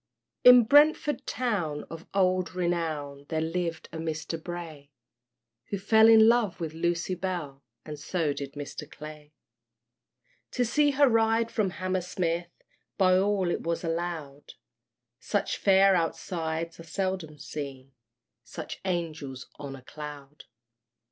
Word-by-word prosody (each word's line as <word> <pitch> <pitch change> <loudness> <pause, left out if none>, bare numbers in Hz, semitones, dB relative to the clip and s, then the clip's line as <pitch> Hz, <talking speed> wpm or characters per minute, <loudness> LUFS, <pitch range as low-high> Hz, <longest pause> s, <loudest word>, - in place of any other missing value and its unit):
In 250 -1 +9
Brentford 295 +3 +4
town, 185 -12 -2
of 165 +1 -9
old 185 -2 +1
renown, 155 -5 -2
There 160 - -1
lived 165 0 -2
a 160 - -6
Mister 160 0 -3
Bray, 160 -4 -7 0.8
Who 200 - -3
fell 220 +3 +5
in 220 -1 +8
love 230 -5 +2
with 160 -2 -4
Lucy 170 +2 -1
Bell, 170 -7 -4 0.2
And 150 -1 -7
so 155 -1 -1
did 140 -1 -6
Mr. 145 +1 -7
Clay. 150 0 -11 1.2
To 245 - +1
see 290 +5 +3
her 285 0 +4
ride 225 0 +2
from 210 -4 +1
Hammersmith, 180 -2 -2 0.5
By 185 -2 +5
all 190 -1 +2
it - - -2
was 170 +1 -2
allowed, 165 -4 -4 0.7
Such 205 - -1
fair 195 -1 +5
outsides 165 -1 -2
are - - -8
seldom 185 -3 -3
seen, 135 -3 -7 0.5
Such - - -8
Angels 160 -8 -4
on 140 -2 -6
a 130 - -13
Cloud. 150 0 -10
170 Hz, 130 wpm, -28 LUFS, 155-195 Hz, 1.2 s, In